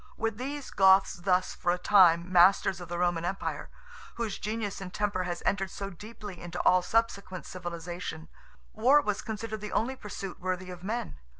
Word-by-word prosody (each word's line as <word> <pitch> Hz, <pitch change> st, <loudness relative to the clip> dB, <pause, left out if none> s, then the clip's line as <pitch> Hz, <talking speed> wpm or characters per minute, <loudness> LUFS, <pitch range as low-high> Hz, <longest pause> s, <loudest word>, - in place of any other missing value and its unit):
With 225 Hz, 0 st, -2 dB
these 280 Hz, +2 st, -5 dB
Goths 190 Hz, 0 st, +5 dB
thus 180 Hz, +1 st, +1 dB
for 175 Hz, -, 0 dB
a 180 Hz, -, 0 dB
time 180 Hz, -2 st, +5 dB
masters 185 Hz, 0 st, +5 dB
of 175 Hz, -, -9 dB
the 175 Hz, -, -3 dB
Roman 175 Hz, -1 st, +1 dB
Empire, 190 Hz, +3 st, -3 dB, 0.5 s
whose 225 Hz, -4 st, -3 dB
genius 210 Hz, -2 st, -3 dB
and 185 Hz, -1 st, -6 dB
temper 200 Hz, -3 st, -1 dB
has 175 Hz, -1 st, -4 dB
entered 195 Hz, -1 st, +1 dB
so 195 Hz, +1 st, -6 dB
deeply 205 Hz, 0 st, -10 dB
into 175 Hz, 0 st, -6 dB
all 185 Hz, -, +5 dB
subsequent 200 Hz, -2 st, -1 dB
civilization, 175 Hz, -2 st, -6 dB, 0.5 s
war 255 Hz, +7 st, +5 dB
was 210 Hz, -4 st, -2 dB
considered 220 Hz, 0 st, -5 dB
the 210 Hz, -, -6 dB
only 255 Hz, +4 st, 0 dB
pursuit 195 Hz, -5 st, -7 dB
worthy 185 Hz, 0 st, -3 dB
of 180 Hz, -1 st, -9 dB
men. 195 Hz, -, -4 dB
190 Hz, 175 wpm, -29 LUFS, 175-210 Hz, 0.5 s, Goths